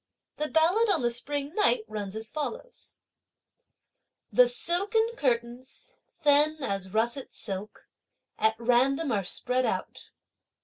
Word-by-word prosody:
The 300 - -1
ballad 350 +9 +3
on 330 -10 +2
the 240 - +2
spring 285 +4 -2
night 435 +3 +2
runs 205 -2 -5
as 220 +1 -2
follows: 460 - -6 1.3
The - - +6
silken 445 0 +1
curtains, 250 - -3 0.2
thin 300 0 +3
as 195 -4 -2
russet 235 +5 -1
silk, 200 0 -7 0.5
at 220 0 +3
random 255 +5 +2
are 205 -3 0
spread 250 +7 -1
out. - - -4
275 Hz, 120 wpm, -28 LUFS, 235-345 Hz, 1.3 s, The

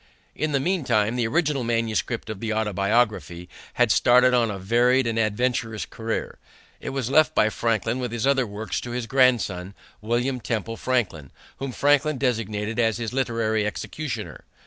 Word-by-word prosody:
In 155 0 -1
the 140 - +2
meantime 125 - +1
the 120 -2 0
original 150 -1 0
manuscript 115 -1 -1
of 105 - -7
the 110 0 -3
Autobiography 105 -3 0 0.3
had 120 -3 +3
started 125 +3 +5
on 120 -2 +3
a 100 - -4
varied 120 +6 +2
and 115 -1 -1
adventurous 115 +1 -1
career. 115 0 -4 0.4
It - - -5
was 135 -2 -3
left 155 +1 +4
by 110 - +4
Franklin 115 +2 -1
with 125 -2 -3
his 120 0 -2
other 135 -3 +2
works 105 +2 -4
to 120 - -7
his 120 0 -3
grandson, 115 -8 +1 0.3
William 120 +4 -1
Temple 115 -1 -3
Franklin, 95 - -1 0.3
whom 135 -1 -4
Franklin 145 +2 +2
designated 110 -3 -2
as 115 -2 +2
his 115 -1 -4
literary 115 -4 0
executor. 135 +7 -5
115 Hz, 160 wpm, -24 LUFS, 110-130 Hz, 0.4 s, started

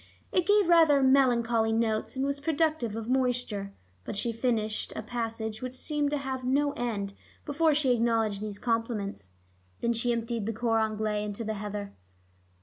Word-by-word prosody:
It 360 - +1
gave 410 -2 +4
rather 320 -5 +6
melancholy 240 -4 +3
notes, 225 +2 0
and 265 +1 0
was 280 0 -1
productive 310 -6 0
of 225 0 -5
moisture. 245 -6 0 0.3
But - - -5
she 230 +4 -1
finished 225 -2 -1
a - - -4
passage 225 -1 -4
which 255 0 -5
seemed 295 +1 -1
to 295 - 0
have 265 -2 -4
no 285 +3 +2
end, 215 -7 -3 0.3
before 305 +1 +2
she 280 -4 +2
acknowledged 225 -3 +1
these 210 -1 -5
compliments. 225 - -2 0.5
Then 235 - +1
she 235 +1 0
emptied 230 -2 -2
the 225 - -1
cor 225 0 +1
anglais 215 -1 -1
into 210 +2 -4
the 220 0 -2
heather. 205 -1 -5
235 Hz, 165 wpm, -28 LUFS, 215-265 Hz, 0.5 s, rather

